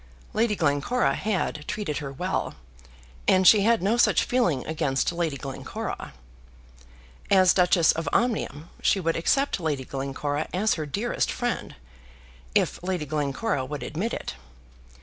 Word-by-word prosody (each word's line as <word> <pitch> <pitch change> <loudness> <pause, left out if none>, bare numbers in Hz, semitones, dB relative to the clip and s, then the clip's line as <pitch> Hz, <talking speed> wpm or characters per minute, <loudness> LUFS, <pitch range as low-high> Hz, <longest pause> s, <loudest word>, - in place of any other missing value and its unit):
Lady 220 -1 +2
Glencora 155 - +1
had 190 -7 -2
treated 200 -9 -3
her 140 -3 -5
well, 180 +7 -2 0.7
and 185 -1 +5
she 210 - +8
had 225 0 +3
no 215 +5 +2
such - - +4
feeling 175 - +1
against 145 -3 0
Lady 170 -4 -2
Glencora. 135 0 -6 1.2
As 185 -2 +6
Duchess 180 -3 +4
of 165 - -3
Omnium 210 - -1
she 195 - +3
would 165 -2 0
accept 270 +9 +1
Lady 150 -6 -2
Glencora 140 +3 -3
as 210 +3 +2
her 155 -2 -4
dearest 210 +11 -1
friend, 245 -1 -3 0.8
if - - +1
Lady 180 -3 -2
Glencora 145 +1 -1
would 140 0 -5
admit 180 - -3
it. - - -4
170 Hz, 135 wpm, -26 LUFS, 145-210 Hz, 1.2 s, she